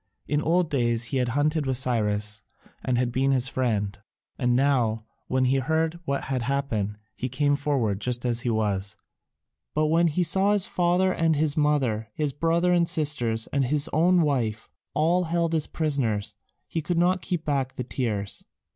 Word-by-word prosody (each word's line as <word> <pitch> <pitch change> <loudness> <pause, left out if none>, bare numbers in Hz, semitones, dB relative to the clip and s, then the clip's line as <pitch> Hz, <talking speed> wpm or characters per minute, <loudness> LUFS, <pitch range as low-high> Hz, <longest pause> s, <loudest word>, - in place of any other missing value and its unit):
In 150 0 0
old 170 +1 +1
days 120 -4 +1
he - - +2
had 125 -1 +1
hunted 150 0 +1
with 130 -1 +1
Cyrus 105 -4 +1 0.4
and 125 -1 0
been 135 +3 +1
his 130 -1 +3
friend, 105 -7 -1 0.4
and 125 -2 +1
now, 120 -5 +1 0.2
when 130 0 +1
he 130 +2 +2
heard 160 +4 0
what 140 0 -1
had 130 -2 -2
happened, 120 -6 -2 0.2
he 130 - -4
came 145 +3 +1
forward 130 -9 -1
just 125 +2 -2
as 120 -1 0
he 120 - -1
was; 100 -3 -1 0.8
but 155 +1 +2
when 170 +2 +3
he 165 +3 +1
saw 195 +5 +3
his 205 -3 +2
father 180 +1 +1
and 165 -1 +2
his 150 0 +1
mother, 135 -8 +1
his 150 -3 -1
brother 165 +4 +1
and 170 -1 +3
sisters, 125 -8 +1
and 140 -2 +2
his 145 +3 +2
own 175 +3 +4
wife 120 -7 -1 0.3
all 175 +4 +2
held 165 0 0
as 155 -2 0
prisoners, 130 -10 -1 0.3
he 165 - -3
could 170 +3 -2
not 180 +1 +2
keep 175 -2 -3
back 135 -3 -1
the 125 - -3
tears. 110 -6 -3
140 Hz, 175 wpm, -25 LUFS, 120-160 Hz, 0.8 s, own